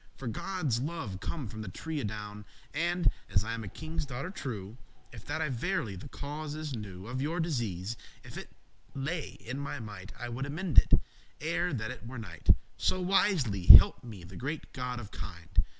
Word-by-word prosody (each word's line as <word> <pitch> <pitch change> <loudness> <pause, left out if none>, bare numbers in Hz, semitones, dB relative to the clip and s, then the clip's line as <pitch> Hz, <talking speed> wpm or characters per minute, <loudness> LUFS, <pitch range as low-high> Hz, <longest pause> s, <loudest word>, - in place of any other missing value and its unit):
For 135 - -6
Godde's 150 - 0
love 140 - -3
come 145 - -3
from 110 +1 -6
the 110 - -6
tree 160 - -4
adown 105 0 -5 0.3
And, 175 +3 +1 0.2
as 95 0 +3
I 115 +1 -2
am 115 -1 -3
a - - -5
kinge's 160 - -4
daughter 140 +5 -4
true, 110 - -5 0.4
If 110 -3 -10
that 160 - -1
I 155 - 0
verily 125 - -1
the 95 - -8
causes 150 +1 -4
knew 100 -4 -7
Of 125 +3 -3
your 160 +5 0
disease,* 115 - -1 0.3
if - - -10
it - - -6 0.5
lay 145 0 -2
in 130 +1 -5
my 140 - -3
might, 105 -4 -7
*distress 120 - -7
I - - -4
would 125 +3 -2
amend 160 +2 +5
it, - - 0 0.5
ere 170 +3 0
that 110 -3 -2
it 115 - -8
were 130 +1 -6
night, 90 -8 -8 0.3
So 185 - +2
wisly 170 - +2
help - - +11
me 110 -7 -8
the 90 +3 -10
great 150 +5 -4
God 125 -1 -3
of 105 -3 -8
kind. 85 -3 -2
125 Hz, 195 wpm, -31 LUFS, 105-155 Hz, 0.5 s, help